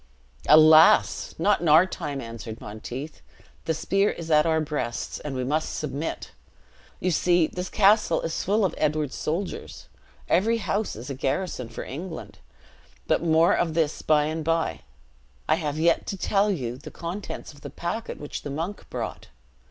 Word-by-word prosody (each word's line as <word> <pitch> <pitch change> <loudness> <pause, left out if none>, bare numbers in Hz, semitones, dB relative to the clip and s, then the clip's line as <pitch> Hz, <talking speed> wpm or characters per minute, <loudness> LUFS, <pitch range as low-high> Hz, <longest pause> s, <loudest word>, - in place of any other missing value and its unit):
"Alas! 155 +1 +6
not 200 +4 +2
in 175 - -1
our 160 +4 +7
time!" 145 -6 -5
answered 115 -1 -8
Monteith. 125 +8 -7 0.4
"The 160 - 0
spear 195 +5 +1
is 165 -1 -5
at 150 +1 +5
our 160 -1 +2
breasts, 150 -6 -3
and 145 -3 -5
we 130 - -2
must 150 +5 -1
submit. 150 +1 -4 0.7
You 185 - 0
see 175 0 +3
this 180 +3 -5
castle 205 -4 +4
is 165 - -3
full 205 +2 +2
of 175 - -1
Edward's 150 -2 0
soldiers. 175 +5 -4 0.4
Every 225 +6 +2
house 215 -1 -2
is 120 +5 -7
a - - -2
garrison 135 -1 -2
for 115 - -6
England 160 +5 -7 0.7
but - - +1
more 165 0 +4
of 165 -2 0
this 160 -2 0
by 150 -1 +3
and 155 +1 -3
by; 165 - 0 0.7
I - - +4
have 155 -2 -2
yet 165 +1 +2
to 195 - -3
tell 200 +2 +1
you 125 - -2
the 155 +2 -9
contents 170 +2 -6
of 145 - -18
the 145 - -7
packet 175 - -5
which 145 - -6
the - - -6
monk 165 +8 -5
brought. - - -5
160 Hz, 165 wpm, -25 LUFS, 145-180 Hz, 0.7 s, our